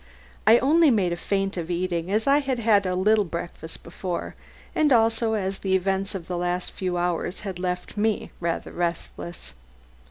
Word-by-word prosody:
I 225 +2 +9
only 305 +5 +5
made 195 -8 +2
a - - -1
feint 195 +2 -1
of 170 -1 -4
eating, 175 -1 -1
as 215 +3 +1
I 280 +1 +5
had 270 -3 -1
had 210 -4 +3
a 180 - 0
little 210 +3 +4
breakfast 170 -2 -6
before, 175 +1 -4 0.4
and 305 -2 +3
also 225 -1 +3
as 195 -2 -1
the 190 -1 +1
events 195 +2 0
of 180 -4 -5
the 175 0 -3
last 180 0 -1
few 180 -2 -2
hours 175 +1 -1
had 190 -3 -5
left 180 +1 -3
me 215 0 0
rather 170 -1 -2
restless. 170 - -4
190 Hz, 180 wpm, -25 LUFS, 175-220 Hz, 0.4 s, I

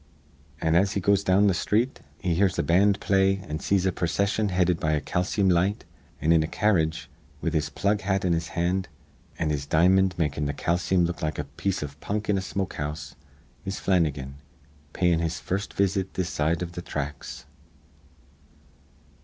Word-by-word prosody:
"An', 80 0 +1
as 95 +4 +3
he 100 - 0
goes 100 +1 +2
down 100 +2 +4
th' 95 - +3
sthreet, 115 +8 0 0.2
he 90 -2 -1
hears 95 +1 +2
a - - +1
band 100 +3 +3
play 95 0 +2
an' 80 -5 -6
sees 95 0 +1
a 95 - +2
procission 100 +5 0
headed 90 -2 +1
be - - -2
a 75 -1 +2
calceem 90 +6 0
light; 95 +3 +1 0.3
an', 80 +3 +2
in 80 -1 +5
a 80 - -1
carredge, 80 -5 +1 0.3
with 85 -1 -2
his 80 -1 0
plug 105 +1 0
hat 95 -1 0
in 90 - +2
his 80 -1 -1
hand 90 +2 0 0.5
an' 80 -1 0
his 70 -1 -3
di'mond 90 +4 +3
makin' 75 -3 -1
th' 70 - -4
calceem 90 +1 +1
look 85 +1 -4
like 75 0 -2
a 75 - -2
piece 75 +6 -3
iv 70 0 -8
punk 105 +4 -3
in 100 - +3
a - - -3
smokehouse, 75 -7 -4 0.5
is 95 -1 -4
Flannigan, 75 -7 0 0.6
payin' 90 -2 +2
his 80 -2 -2
first 95 +7 -3
visit 95 -1 0
this 90 -1 -1
side 80 +3 0
iv 85 - -5
th' 90 0 -7
thracks." 75 -3 -5
90 Hz, 180 wpm, -26 LUFS, 80-95 Hz, 0.6 s, in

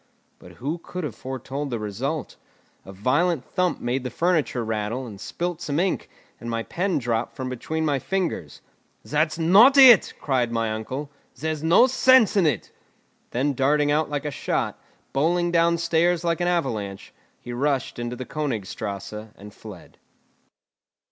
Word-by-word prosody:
But - - -14
who 150 +7 -4
could 180 +2 -7
have 145 -7 -4
foretold 135 +2 -5
the 120 - -2
result? 120 +9 -4 0.5
A 95 - -9
violent 135 - +1
thump 180 -1 -1
made 125 +2 -1
the 125 - -3
furniture 155 -5 0
rattle, 110 +3 -2
and 105 -4 -10
spilt 175 +4 -4
some 150 -2 -1
ink, 185 +1 -1 0.3
and 120 - -7
my 115 0 -2
pen 185 +7 -1
dropped 120 -2 -2
from 130 -1 -4
between 160 +6 -3
my 145 -3 +1
fingers. 175 - -3 0.4
"That's 155 +2 0
not 200 - +6
it," 255 -7 +8
cried 125 -4 0
my 115 -1 -1
uncle, 130 +7 -5 0.3
"there's 155 -1 -2
no 165 +9 +6
sense 255 -4 +5
in 190 -5 +4
it." 135 -9 -2 0.6
Then 140 +4 0
darting 145 +3 +2
out 155 +1 +1
like 145 0 -3
a 150 - -2
shot, - - -2 0.3
bowling 170 +5 +1
down 170 0 +3
stairs 170 +1 +1
like 170 0 0
an 175 - +1
avalanche, 110 - -2 0.3
he 120 - -8
rushed 135 0 -1
into 120 +1 -3
the 130 - -6
Königstrasse 110 -6 -4
and 105 +1 -12
fled. 105 -6 -13
145 Hz, 160 wpm, -24 LUFS, 120-170 Hz, 0.6 s, it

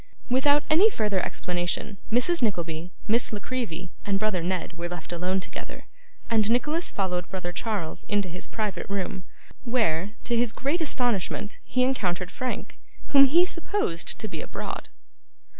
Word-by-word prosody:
Without 285 +3 +5
any 355 +8 +6
further 210 - +1
explanation, 180 +3 -2
Mrs. 250 +10 +3
Nickleby, 170 -6 -1 0.2
Miss 230 +3 +3
La 215 - -2
Creevy, 200 -7 -3
and 200 -1 +1
brother 205 -3 +1
Ned, 180 +1 -1
were 170 0 -4
left 175 -1 -5
alone 180 +2 0
together, 185 - -7 0.4
and 220 -2 +3
Nicholas 300 +8 +2
followed 180 -3 -1
brother 180 -2 -3
Charles 200 -5 -2
into 205 -2 +1
his 180 +1 -6
private 215 -3 -3
room; 190 -1 -2 0.4
where, 210 -6 +1
to 240 - 0
his 235 -1 +2
great 295 +6 0
astonishment, 230 - 0
he 255 0 +1
encountered 185 -9 0
Frank, 255 -1 -4 0.3
whom 275 -1 +8
he 335 +6 +5
supposed 335 - -1
to 220 - -4
be - - -4
abroad. - - -5
210 Hz, 150 wpm, -27 LUFS, 180-255 Hz, 0.4 s, whom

